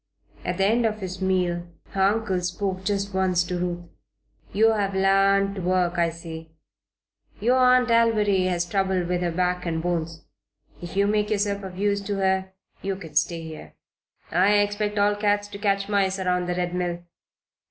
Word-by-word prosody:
At - - -2
the 195 - +2
end 230 +3 +3
of 215 -1 -3
his 185 -1 -6
meal 180 -2 0 0.2
her 195 - -2
uncle 195 -1 +1
spoke 185 +1 -3
just 200 0 -1
once 185 -2 +2
to 175 0 -3
Ruth. 175 -1 -3 0.7
"You 225 +2 +4
have 200 -3 -1
l'arned 195 +1 +3
to - - -3
work, 180 -1 +1
I 170 -1 +3
see. 165 -1 -9 0.9
Your 245 +5 +3
Aunt 250 -1 +4
Alviry 215 -5 +3
has 175 -1 0
trouble 190 0 0
with 180 0 -1
her 175 - 0
back 180 +1 -1
and 165 -2 -2
bones. 165 -1 -3 0.6
If 175 +2 -7
you 200 - +4
make 210 0 +1
yourself 200 -1 0
of 190 -2 -8
use 200 0 +1
to 200 0 -3
her 190 -1 0 0.3
you 195 0 -2
can 165 -5 -10
stay 165 +2 +1
here. 155 - -10 0.6
I 185 +4 +4
expect 205 0 +1
all 205 0 +3
cats 205 0 +1
to 200 - -8
catch 200 -1 0
mice 195 -2 +1
around 180 -1 0
the 180 - -1
Red 180 0 -2
Mill. 175 -1 -2
190 Hz, 180 wpm, -24 LUFS, 180-205 Hz, 0.9 s, You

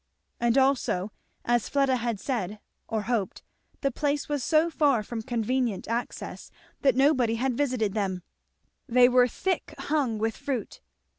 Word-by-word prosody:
And 235 +2 +2
also 260 -8 +2 0.3
as 240 -1 +1
Fleda 275 -2 +2
had 235 -3 -2
said, 215 -6 -3 0.3
or 220 -2 -2
hoped, 225 -6 -2 0.4
the 275 - +1
place 290 +2 -1
was 290 -3 -2
so 320 +1 +3
far 280 -8 +2
from 225 +1 -5
convenient 240 -2 -1
access 235 +2 -4 0.3
that 270 -3 +4
nobody 260 -4 +3
had 255 +2 0
visited 245 -7 0
them; 190 -4 -2 0.7
they 245 +1 +6
were 250 0 +5
thick 375 +9 -2
hung 280 -7 0
with 225 +1 -1
fruit. 270 -5 -4
245 Hz, 145 wpm, -27 LUFS, 225-275 Hz, 0.7 s, they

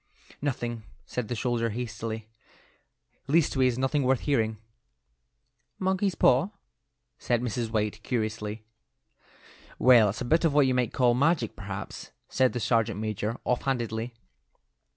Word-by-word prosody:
"Nothing," 120 -5 -2 0.2
said 125 -3 -4
the 120 - -3
soldier, 115 0 0
hastily. 110 -1 -5 1.0
"Leastways 135 -5 +2
nothing 135 +3 +1
worth 130 -1 +2
hearing." 110 -6 0 1.2
"Monkey's 190 0 0
paw?" 135 +8 +4 0.7
said 120 -1 +1
Mrs. 120 -1 -2
White, 105 -1 -1
curiously. 110 -2 -3 1.1
"Well, 120 -5 +6
it's 100 - -3
just - - -7
a - - -5
bit 160 +8 +3
of 160 -4 +2
what 145 -2 +6
you 130 - +2
might 125 -3 +1
call 125 -3 +3
magic, 140 -2 +1
perhaps," 95 0 -7 0.2
said 130 -1 +2
the 125 - -2
sergeant 115 -2 +1
major, 110 +1 -2
offhandedly. 120 -2 -1
120 Hz, 130 wpm, -27 LUFS, 110-130 Hz, 1.2 s, Well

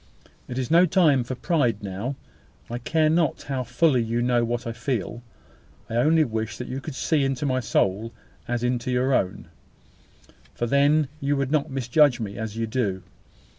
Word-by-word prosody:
It 125 - -6
is 130 0 -2
no 175 +2 +6
time 155 -7 +4
for 130 +2 -5
pride 125 - 0
now. 100 +8 -4 0.6
I 120 - -3
care 155 +5 +1
not 160 -1 +1
how 135 -2 -3
fully 125 +2 +2
you 115 +1 -1
know 120 -1 +2
what 120 +1 -2
I 115 - -3
feel. 115 -2 -3 0.7
I 115 - -1
only 155 +6 +4
wish 110 -4 -3
that 125 - -6
you 130 +2 -5
could 145 -1 -7
see 150 0 +1
into 135 +1 -1
my 130 -2 +1
soul 110 -2 0 0.4
as 120 0 -2
into 125 0 -1
your 125 +2 +1
own; 95 -6 -1 1.1
for 120 - -1
then 140 +4 +3
you 140 0 0
would 140 -1 -1
not 155 0 +1
misjudge 135 +1 +3
me 100 -3 -5
as 110 -1 -5
you 115 - 0
do. 105 -5 -2
125 Hz, 180 wpm, -24 LUFS, 115-140 Hz, 1.1 s, no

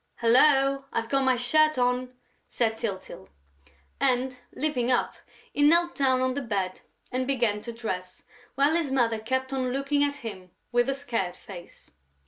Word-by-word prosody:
"Hullo, 270 +3 +4
I've 225 0 -2
got 275 0 +1
my 260 -1 +4
shirt 310 +5 +3
on!" 250 0 0 0.3
said 225 -2 0
Tyltyl. 190 - -6 0.7
And, 255 -1 +1 0.2
leaping 260 -5 -1
up, 250 - +1 0.4
he - - -1
knelt 340 +4 +4
down 260 -2 +2
on 255 0 +1
the 285 - -3
bed 195 -6 -3 0.3
and 255 0 -1
began 235 -6 +1
to 235 - -6
dress, 185 -6 -6 0.3
while 280 +4 +3
his 330 -4 0
mother 235 -4 +1
kept 260 +4 -2
on 255 -2 -1
looking 275 +2 +1
at 285 0 0
him 190 -4 -7 0.2
with 240 +2 +2
a 270 - 0
scared 230 -10 -3
face. 175 -4 -12
255 Hz, 160 wpm, -27 LUFS, 230-275 Hz, 0.7 s, Hullo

